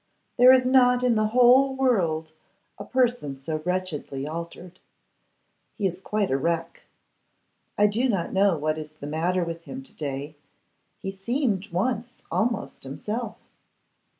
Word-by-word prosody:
There 250 +1 +8
is 260 -1 +5
not 250 -1 +4
in 250 -1 +3
the 215 -1 +2
whole 250 +4 +5
world 175 -12 +1 0.5
a - - -5
person 240 - 0
so 155 +3 -4
wretchedly 175 -6 -3
altered. 170 +3 -7 1.0
He 205 - -2
is 185 0 -2
quite 210 -3 -1
a 135 - +2
wreck. 165 +2 -2 1.0
I 205 - +5
do 230 +5 +1
not 195 -7 -1
know 195 -3 +3
what 155 +1 -1
is 155 0 -8
the 155 - -10
matter 170 +5 0
with 165 0 -6
him 260 +1 -7
to 250 -5 -12
day. 145 -2 -5 0.6
He 195 - -5
seemed 210 0 -1
once 240 +6 -2
almost 230 -1 -1
himself. 210 - -5
195 Hz, 145 wpm, -25 LUFS, 160-245 Hz, 1.0 s, There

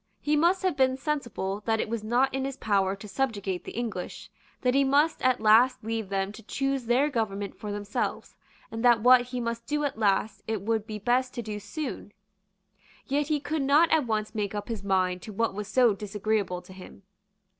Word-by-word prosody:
He 300 +1 +1
must 345 +5 +3
have 370 -5 +1
been 260 -1 +2
sensible 235 -9 -3
that 225 -1 +2
it - - -1
was 225 -1 -3
not 245 +5 +2
in 270 0 -1
his 270 0 -4
power 195 -5 +1
to 200 +2 -11
subjugate 200 -7 -2
the - - -7
English, 200 -4 -5 0.3
that 250 -1 +2
he 275 +1 +4
must 290 +4 +2
at 255 -1 +2
last 225 +4 +5
leave 225 -2 -3
them 195 0 -1
to 215 - -11
choose 270 +3 -2
their 255 +5 +3
government 205 -4 -2
for 210 - -6
themselves, 205 0 -3 0.4
and 225 +1 -4
that 240 -3 +5
what 250 +1 +7
he 250 0 -4
must 235 0 -4
do 295 0 0
at 275 -6 -2
last 205 -1 +1
it 220 -3 -2
would 220 0 -1
be 215 -2 -5
best 250 +4 0
to 240 - -3
do 210 -1 -5
soon. 205 0 -6 0.9
Yet 285 +1 0
he 305 -1 +1
could 300 +2 -2
not 290 +5 +4
at 310 -6 +3
once 215 -1 -1
make 210 -1 -2
up 205 +2 -5
his 225 -3 -4
mind 185 -2 +1
to 215 - -9
what 230 +1 0
was 205 0 -5
so 240 0 +4
disagreeable 205 -2 -2
to 185 - -13
him. 190 +1 -13
225 Hz, 210 wpm, -27 LUFS, 205-265 Hz, 0.9 s, what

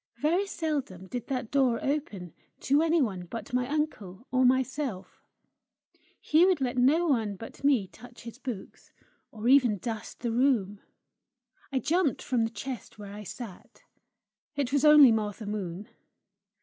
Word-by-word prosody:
Very 340 +10 +1
seldom 285 - -3
did 240 +4 -6
that 255 -5 -3
door 265 -4 +3
open 215 - -3 0.3
to 280 +3 +3
any 325 -1 +3
one 185 -6 -4
but 225 +4 -8
my 250 0 +1
uncle 255 - -3
or 255 0 +3
myself: 260 -4 -1 1.0
he 315 +3 +3
would 370 -3 +3
let 255 -2 -1
no 280 +8 +3
one 225 -10 0
but 225 +6 -11
me 270 -8 +3
touch 240 +4 -14
his 235 +2 -10
books, 245 -8 -8 0.4
or 220 +1 -5
even 250 -5 +5
dust 225 +1 -6
the 235 -1 -1
room. 225 -5 +1 0.9
I 270 - 0
jumped 320 +1 +1
from 240 -3 +1
the - - -2
chest 230 0 -7
where 200 -1 -9
I 210 - -8
sat. 210 -1 -10 0.7
It 280 -2 -2
was 285 - +2
only 300 -4 +8
Martha 215 0 -2
Moon. 200 -1 -5
245 Hz, 150 wpm, -28 LUFS, 210-280 Hz, 1.0 s, only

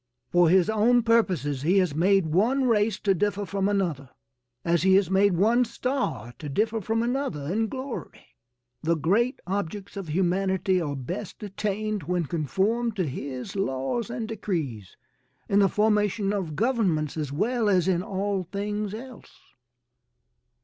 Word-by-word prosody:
For 175 -2 +5
his 185 +1 +4
own 225 +3 +3
purposes 180 - +1
he 175 +7 +2
has 180 -6 +2
made 190 +4 +3
one 225 - +2
race 215 -3 +2
to 195 - +3
differ 205 +2 -1
from 195 0 -1
another, 170 -10 -1 0.6
as 170 -1 +2
he 190 +2 +5
has 190 -2 +3
made 190 -1 +3
one 230 +6 +4
star 235 - -3
to 150 - -6
differ 220 +8 0
from 225 +3 0
another 245 - -2
in 225 +2 +1
glory. 260 +2 -7 0.6
The 165 +1 +1
great 205 - +1
objects 200 +1 -4
of 195 -3 -5
humanity 190 +2 +1
are 145 -3 -3
best 175 - -6
attained 210 +1 -2
when 175 +2 -1
conformed 195 - 0
to 185 -4 0
his 135 +4 -6
laws 195 - -1
and 235 -2 -4
decrees 160 - -4 0.5
in 200 - +3
the 195 -1 +5
formation 210 -1 +1
of 180 -7 -3
governments 190 - +1
as 150 -3 -3
well 225 - 0
as 185 -3 +3
in 180 -2 +2
all 195 0 -2
things 205 +3 -3
else. 250 +1 -11
195 Hz, 150 wpm, -26 LUFS, 170-215 Hz, 0.6 s, For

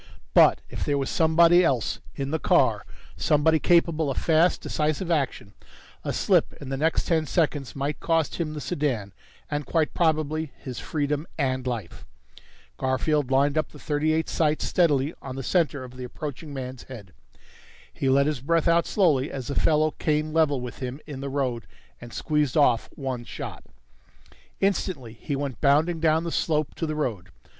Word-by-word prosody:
But - - +6
if - - -5
there 145 -1 0
was 135 -1 -2
somebody 170 +2 +5
else 130 -9 0 0.2
in 140 0 -3
the 160 - 0
car, - - +2 0.3
somebody 155 +1 +3
capable 165 -3 +3
of 135 - -3
fast, 165 +2 +3
decisive 155 +4 -1
action, 135 -10 -1 0.5
a - - -2
slip - - +2
in 140 - -10
the 135 - -2
next 160 +4 +1
ten 160 -3 +1
seconds 145 -5 0
might 140 +2 -2
cost 165 -2 0
him 155 -3 -3
the 150 - -5
sedan, 125 -7 -2 0.4
and 145 0 -1
quite 160 0 +1
probably 155 -2 0
his 130 -3 -7
freedom 150 -2 -2
and 130 -3 -1
life. 115 -8 -5 0.7
Garfield 130 +2 0
lined 140 +3 +3
up - - -2
the - - -14
.38's 155 +1 0
sights 155 -2 +1
steadily 150 -4 +2
on 130 -1 -7
the 135 - -5
center 150 -4 +1
of 125 0 -11
the 125 - -7
approaching 145 +4 -7
man's 130 -2 -6
head. 105 -9 -11 0.8
He 135 - -1
let 140 +1 +4
his 150 -4 -1
breath 165 +4 +1
out 170 0 +3
slowly 155 -9 +2
as 130 -3 -6
the - - -1
fellow 155 +1 +2
came 155 0 -1
level 155 -4 +3
with 125 -1 -7
him 130 +2 -5
in 140 -3 -7
the 140 - -4
road 130 -4 -2 0.3
and 120 0 -10
squeezed 150 -1 0
off 125 -6 +3
one 130 -4 -4
shot. - - -8 0.9
Instantly 180 - -1
he 140 +5 -4
went 135 -4 -4
bounding 155 +4 +3
down 160 0 +2
the 170 - -3
slope 155 -3 0
to 165 - -3
the 155 - -2
road. 110 -11 -3
145 Hz, 175 wpm, -25 LUFS, 130-160 Hz, 0.9 s, But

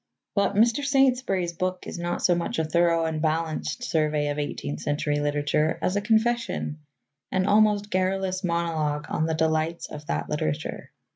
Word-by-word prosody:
But 200 -1 +1
Mr. 235 +6 +3
Saintsbury's 255 -10 +2
book 185 +1 -3
is - - -6
not 175 0 -2
so 180 - +5
much 170 0 -2
a 160 - +1
thorough 170 +1 +2
and 160 -1 -2
balanced 160 +8 -1
survey 155 -7 +1
of 145 0 -2
eighteenth 75 - -4
century 145 - -1
literature 145 +2 +1
as 185 - 0
a 205 - +1
confession, 225 -7 0 0.5
an 185 0 +1
almost 205 0 +3
garrulous 185 0 0
monologue 165 -4 -1
on 160 - 0
the 160 - 0
delights 160 +1 0
of 150 0 -8
that - - -2
literature. 75 - -3
170 Hz, 160 wpm, -26 LUFS, 155-195 Hz, 0.5 s, so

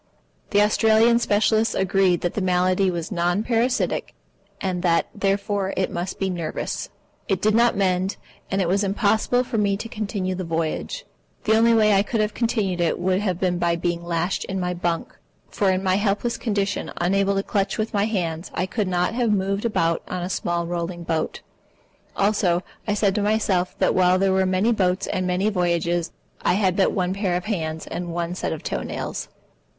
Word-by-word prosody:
The 205 0 +4
Australian 220 +2 +4
specialists 220 0 +2
agreed 190 -2 +2
that 175 - -1
the 210 - -2
malady 185 +1 +2
was 170 0 -4
non 175 +2 +1
parasitic, 240 +2 0 0.4
and 185 -2 -2
that, 170 -2 +2
therefore, 200 0 -1
it 190 - 0
must 175 +2 -4
be 195 - -1
nervous. 170 -4 -3 0.4
It 195 -3 +1
did 215 +2 +2
not 235 -1 +3
mend, 185 0 +1 0.3
and 195 0 +1
it - - -1
was 195 +4 +2
impossible 215 +5 +2
for 230 -3 -2
me 200 -1 +1
to 225 - -6
continue 205 -4 -3
the 185 0 -4
voyage. 165 - -3 0.4
The 220 - +3
only 230 +1 +5
way 215 -2 +4
I 195 - +5
could 215 +2 -2
have 210 0 0
continued 210 -7 0
it 170 - +1
would 185 +1 +1
have 185 -4 -1
been 180 -2 0
by 170 -1 +2
being 170 0 -2
lashed 170 +2 -1
in 190 0 -3
my 180 0 -1
bunk, 175 -1 -2 0.4
for 200 - +1
in 185 0 +1
my 185 0 +2
helpless 205 +3 0
condition, 205 -3 -2
unable 195 +3 +2
to 195 - 0
clutch 200 -1 -1
with 220 +1 -2
my 200 0 +2
hands, 175 -6 -2
I 180 - 0
could 210 +1 -2
not 180 +2 0
have 235 -2 +1
moved 195 +1 0
about 165 -7 +1
on 180 -1 -4
a 180 - -3
small 170 -2 -1
rolling 175 0 -4
boat. 165 -1 -2 0.8
Also, 195 -3 +2 0.2
I 205 - +1
said 200 -2 +2
to 210 - 0
myself 205 -4 +1
that - - +2
while 185 0 +4
there 195 0 +2
were 190 0 +2
many 190 +5 +2
boats 185 -4 +1
and 185 -1 -2
many 180 +3 +1
voyages, 175 -2 0 0.3
I - - +2
had 190 -2 +2
but 195 - +3
one 185 -1 0
pair 195 -3 -1
of 180 - -6
hands 160 -7 -3
and 175 -1 -5
one 170 0 -2
set 185 - -3
of 160 - -5
toe - - -2
nails. - - -5
190 Hz, 195 wpm, -23 LUFS, 175-210 Hz, 0.8 s, only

